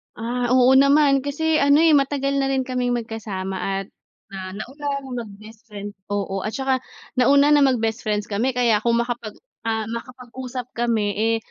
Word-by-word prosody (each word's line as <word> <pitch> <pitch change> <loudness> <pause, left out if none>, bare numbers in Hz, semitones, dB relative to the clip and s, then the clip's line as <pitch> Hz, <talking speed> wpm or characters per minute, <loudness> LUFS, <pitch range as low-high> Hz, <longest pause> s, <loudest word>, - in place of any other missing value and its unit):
Ah 245 +2 -2
oo 255 0 +5
naman, 280 0 +5
kasi 310 +2 +1
ano 285 +3 +5
eh 330 - +6
matagal 275 -1 +2
na 270 - +1
rin 265 -1 0
kaming 250 -1 -1
magkasama 210 -5 -4 0.3
at, 195 - -18 0.4
ah 190 -1 -6
nauna 275 +7 -7 0.2
na 265 - -10 0.2
mag 205 - -12
bestfriend, 215 -2 -10 0.2
oo 200 -1 -2
at 215 - -3
saka 265 -1 0 0.4
nauna 280 +3 +5
na 295 - +6
mag 255 -3 +2
bestfriends 215 -2 -1
kami 230 +5 0
kaya 235 -4 +3
kung 235 +2 +1
makapag, 235 -3 -5 0.3
ah 220 -1 0
makapag-usap 250 +1 -7
kami, 230 -3 0
eh 225 +1 +2
245 Hz, 165 wpm, -22 LUFS, 220-270 Hz, 0.4 s, eh